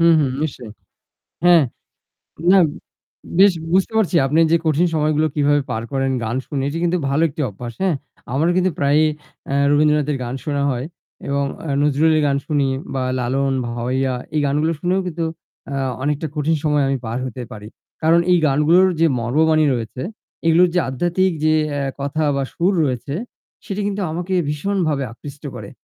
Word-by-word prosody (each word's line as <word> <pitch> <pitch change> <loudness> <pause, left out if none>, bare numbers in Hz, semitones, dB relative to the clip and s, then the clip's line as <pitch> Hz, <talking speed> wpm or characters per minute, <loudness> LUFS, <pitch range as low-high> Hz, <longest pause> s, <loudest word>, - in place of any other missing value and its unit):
হু, 170 - +5
হু। 145 - +2 0.2
নিশ্চয়ই। 125 -7 -5 0.7
হ্যাঁ। 175 -4 +6 0.9
না, 195 - +7 0.8
বেশ 195 +1 +7 0.2
বুঝতে 190 +4 +2
পারছি 190 -4 +1
আপনি 150 +4 +1
যে 170 - +6
কঠিন 160 +3 +3
সময়গুলো 155 0 +2
কীভাবে 145 0 +3
পার 110 -1 -2
করেন 135 0 0
গান 110 +3 -2
শুনে 140 -2 -3
এটি 160 +3 -3
কিন্তু 175 +1 +1
ভালো 140 +4 +1
একটি 150 +2 -8
অভ্যাস, 120 +4 -8
হ্যাঁ? 180 -6 +2 0.4
আমারও 160 +6 +2
কিন্তু 185 0 +2
প্রায়ই 145 +2 +3 0.5
এ - - +1 0.2
রবীন্দ্রনাথের 150 -1 +2
গান 120 +2 -4
শোনা 145 -2 -1
হয় 125 0 -2 0.4
এবং 140 0 0 0.2
আ - - -5
নজরুলের 155 +2 +3
গান 140 - +1
শুনি 145 -3 +1 0.3
বা 130 - -1 0.2
লালন, 135 +3 0 0.2
ভাওয়াইয়া 125 +2 -1 0.2
এই 150 - +2
গানগুলো 150 +4 +1
শুনেও 180 +3 +1
কিন্তু 165 -1 -3 0.5
আ - - -3 0.3
অনেকটা 150 +3 -1
কঠিন 155 +2 +1
সময় 150 -2 +2
আমি 135 - +1
পার 115 +2 -3
হতে 125 0 -6
পারি। 105 -1 -9 0.3
কারণ 165 +2 +5
এই 180 - +5
গানগুলোর 155 +7 +4
যে 165 - +5
মর্মবাণী 155 +6 +2
রয়েছে 120 +1 -5 0.4
এগুলোর 175 +2 +5
যে 180 - +3
আধ্যাত্মিক 175 +7 +1
যে 155 0 +4 0.2
এ - - -1 0.2
কথা 140 +3 -2
বা 140 - 0
সুর 180 +4 +1
রয়েছে 130 +1 -3 0.5
সেটি 200 +1 -4
কিন্তু 205 0 -2
আমাকে 175 +3 -3
ভীষণভাবে 155 -2 -1
আকৃষ্ট 140 +3 -11
করে। - - -8
150 Hz, 165 wpm, -20 LUFS, 135-165 Hz, 0.9 s, না